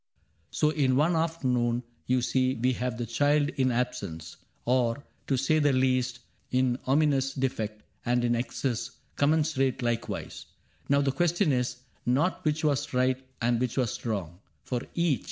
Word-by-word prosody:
" - - -40
So 150 -1 +2
in 135 -5 +2
one 155 +5 +3
afternoon 125 -7 0 0.2
you 125 -1 +2
see 130 +1 +1
we 125 +3 +1
have 125 -1 -3
The 120 - -2
child 145 +5 +2
in 130 -4 +1
absence 120 -10 -3
— - - -40
or, 125 +2 +1 0.2
to 135 - +1
say 155 +5 +2
the 145 -1 +4
least. 130 -1 +1 0.3
In 125 -1 +1
ominous 135 -1 +2
defect, 110 -5 -2
— - - -42
and 120 0 +2
in 120 0 +2
excess 120 0 -2 0.3
Commensurate, 140 -4 +1
likewise. 120 -1 -3 0.4
Now 140 0 +4
the 140 -1 +1
question 175 +4 +2
is. 125 -1 -1 0.2
Not 145 +10 +1
which 155 +1 0
was 145 -3 0
right 130 +1 +2 0.2
and 120 0 +2
which 125 0 -2
was 125 -5 -1
wrong, 95 -7 -3 0.2
for 125 -2 -2
each. 170 -6 +2
130 Hz, 165 wpm, -28 LUFS, 120-145 Hz, 0.4 s, the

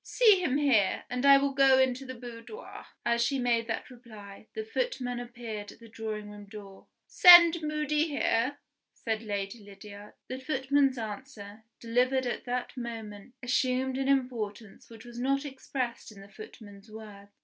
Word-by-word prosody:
"See 430 -6 +4
him 280 -5 +1
here; 250 -10 +2
and 250 +2 0
I 275 0 +9
will 280 0 0
go 270 -1 +5
into 260 0 +1
the 260 - -7
boudoir." 240 - -10 0.2
As 235 0 +2
she 275 +3 0
made 235 -2 0
that 225 +2 -4
reply, 215 -4 -13
the 440 0 -4
footman 435 - -3
appeared 235 -4 -7
at - - -16
the 230 - -14
drawing 215 -2 -6
room 205 0 -11
door. 200 -2 -12 0.2
"Send 345 -2 +8
Moody 300 0 0
here," 280 -2 0 0.4
said 220 -1 -3
Lady 205 0 -4
Lydiard. 205 0 -13
The 255 - -6
footman's 270 -1 +1
answer, 220 -2 -8
delivered 250 +3 +1
at 245 - -4
that 250 0 -4
moment, 225 -2 -8
assumed 255 +1 0
an 270 - -1
importance 235 -6 -2
which 225 0 -13
was 240 0 -10
not 275 +3 0
expressed 260 -4 -5
in 205 - -14
the 195 - -14
footman's 205 0 -13
words. 210 -2 -12
245 Hz, 160 wpm, -29 LUFS, 215-270 Hz, 0.4 s, I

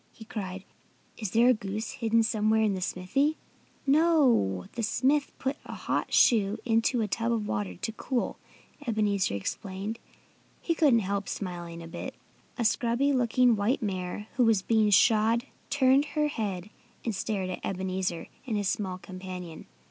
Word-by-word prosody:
he 220 - -13
cried. 190 -4 -5 0.6
"Is 215 -4 -2
there 230 +5 +4
a - - +7
goose 215 0 -4
hidden 230 -2 +2
somewhere 220 0 +2
in 210 -2 +2
the 190 - -4
smithy?" 270 +13 0 0.5
"No! 275 - +3
The 235 - -4
smith 270 +6 +1
put 265 +2 -2
the - - -8
hot - - -2
shoe 210 -3 +4
into 230 +1 +2
a 215 - 0
tub 230 +3 -1
of 220 -3 -1
water, 105 -4 -2
to 225 - -4
cool," 245 +2 -2 0.5
Ebenezer 205 - +1
explained. 195 - -4 0.6
He 335 - 0
couldn't 285 -8 +4
help 200 +1 -2
smiling 175 -3 -5
a - - -8
bit. 165 - -6 0.4
A 235 - 0
scrubby 240 +5 +2
looking 245 -1 +3
white 225 +5 0
mare 185 0 -3
who 250 - +5
was 220 -4 +3
being 220 -1 +3
shod 225 +4 +4 0.2
turned 275 0 +4
her 300 0 +3
head 205 -6 -4 0.3
and 230 - 0
stared 195 -2 -2
at - - -6
Ebenezer 185 -2 -2 0.2
and 220 -4 0
his 205 -1 -1
small 185 -3 -2
companion. 185 -3 -8
215 Hz, 160 wpm, -28 LUFS, 190-240 Hz, 0.6 s, a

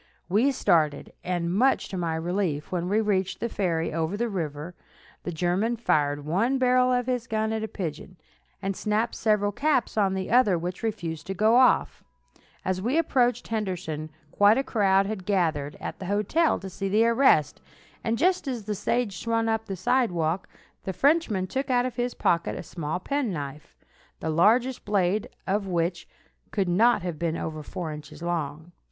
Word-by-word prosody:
We 220 +10 +3
started, 160 - +1
and, 175 -1 -1
much 255 +7 +2
to - - -5
my 170 -3 -1
relief, 165 -2 -2
when 180 -1 -2
we 210 +2 +2
reached 195 -3 0
the 235 - -1
ferry 165 -7 -1
over 165 +4 -1
the 235 +1 -1
river, 160 -3 -4 0.5
the 175 - -4
German 180 +8 0
fired 145 -9 +1
one 215 - +1
barrel 255 0 +3
of 245 -1 +1
his 250 -2 -2
gun 220 0 -1
at 220 - -2
a 220 - -2
pigeon, 180 -2 -6 0.5
and 195 0 -1
snapped 215 +3 0
several 210 -2 +1
caps 275 -1 0
on 195 -2 +2
the 190 -1 -3
other, 225 -7 +4
which 175 +2 -5
refused 165 -8 -4
to 195 - -3
go 215 +4 +4
off. 255 0 +3 0.6
As 185 0 -1
we 245 +9 0
approached 255 -7 +1
Henderson, 180 -8 -3 0.2
quite 205 +2 +5
a 270 - +1
crowd 195 -5 +2
had 205 -2 -4
gathered 165 -7 0
at - - -6
the 185 - -6
hotel 210 - +2
to 195 - -6
see 195 +1 -4
the 215 +3 +4
arrest, 230 - +3 0.4
and 230 0 0
just 360 +1 +1
as 245 -5 -3
the 210 +1 -3
stage 210 0 -1
swung 230 -1 0
up 225 0 0
to 200 - -5
the - - -3
sidewalk, 185 -5 0 0.3
the 190 - -3
Frenchman 275 - +2
took 265 +9 -3
out 245 -1 +3
of 255 -2 -4
his 245 0 -1
pocket 170 0 +1
a - - -6
small 160 0 -4
penknife, 175 - -4 0.4
the 160 - -2
largest 230 +10 +3
blade 200 0 0 0.2
of 200 +1 -1
which 175 0 -1 0.4
could 195 -3 -1
not 220 +5 +3
have 175 -4 -4
been 165 -1 -1
over 155 -1 -4
four 160 +2 -5
inches 150 +2 -10
long. 160 -1 -3
195 Hz, 180 wpm, -26 LUFS, 170-230 Hz, 0.6 s, quite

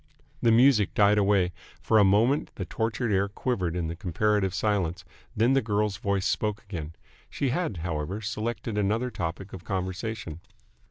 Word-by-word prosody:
The 115 - +4
music 115 -3 +4
died 105 0 +5
away. 100 -3 +2 0.3
For 110 - +3
a - - +7
moment 110 +9 +3
the - - -4
tortured 115 0 -2
air 100 +1 +2
quivered 95 -6 -2
in 85 -1 -2
comparative 95 +3 +1
silence; 95 -3 -1 0.3
then 115 +5 +4
the 135 - +3
girl's 105 -2 0
voice 100 -2 -1
spoke 105 -1 -1
again. 85 -7 -6 0.4
She 140 - -1
had, 140 - -1
however, 85 +4 -3
selected 110 0 -3
another 110 +5 0
topic 90 +1 -5
of 90 - -8
conversation. 95 -2 -4
105 Hz, 155 wpm, -27 LUFS, 95-110 Hz, 0.4 s, a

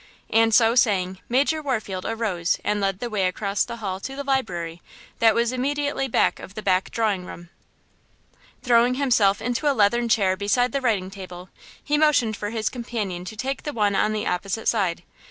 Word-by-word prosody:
And 225 0 +4
so 225 0 +5
saying, 190 -6 +2
Major 285 +5 +2
Warfield 215 -10 -3
arose 205 -7 -1
and 210 0 0
led 195 -1 0
the 245 - -2
way 195 -3 +1
across 200 +2 -1
the 235 - -6
hall 195 -5 -4
to 270 +7 -6
the 280 - -4
library, 175 -12 -2 0.4
that 225 -1 +5
was 235 0 +1
immediately 280 +1 -1
back 245 - +1
of 195 - -11
the 215 - -6
back 185 -1 +1
drawing 210 -5 0
room. 175 -1 -10 1.1
Throwing 245 0 +4
himself 230 -8 +2
into 250 +4 +1
a - - -2
leathern 235 +3 +3
chair 195 -4 +3
beside 205 +6 +1
the 275 - -1
writing 200 -7 0
table, 185 -2 -9 0.3
he 295 0 +1
motioned 280 -8 +3
for 205 0 -4
his 220 -1 -2
companion 215 -7 -4
to 200 - -7
take 265 +5 -3
the 295 - -5
one 205 -4 +1
on 215 - +2
the 215 -1 -2
opposite 195 +4 -2
side. 185 -6 0
220 Hz, 190 wpm, -24 LUFS, 195-245 Hz, 1.1 s, so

